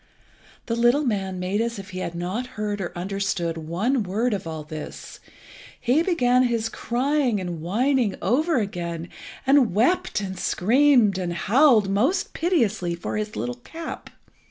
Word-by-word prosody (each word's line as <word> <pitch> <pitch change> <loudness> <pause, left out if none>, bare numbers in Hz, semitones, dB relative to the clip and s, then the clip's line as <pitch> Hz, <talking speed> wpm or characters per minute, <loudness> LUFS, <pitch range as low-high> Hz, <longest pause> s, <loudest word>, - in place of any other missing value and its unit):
The 230 - -1
little 240 +5 +3
man 195 -7 -1
made 190 +4 -1
as 235 0 -2
if 195 0 -9
he 185 - -5
had 170 -2 -4
not 185 +9 -3
heard 205 -1 -2
or 175 - -3
understood 185 -2 -2
one 180 - -1
word 215 +5 0
of 190 -4 -4
all 160 -1 -5
this. 155 0 -8 0.6
He 260 +7 +2
began 255 -9 +3
his 230 -3 0
crying 250 -1 0
and 175 -3 -5
whining 235 - +1
over 300 - +1
again, 170 -5 -3 0.4
and 265 -7 +4
wept 245 - +2
and 190 -2 -5
screamed 235 -1 +3
and 175 -2 -2
howled 225 - +4
most 255 - +1
piteously 220 - 0
for 170 - -5
his 210 0 -3
little 245 0 -3
cap. 330 0 -7
215 Hz, 155 wpm, -24 LUFS, 185-250 Hz, 0.6 s, and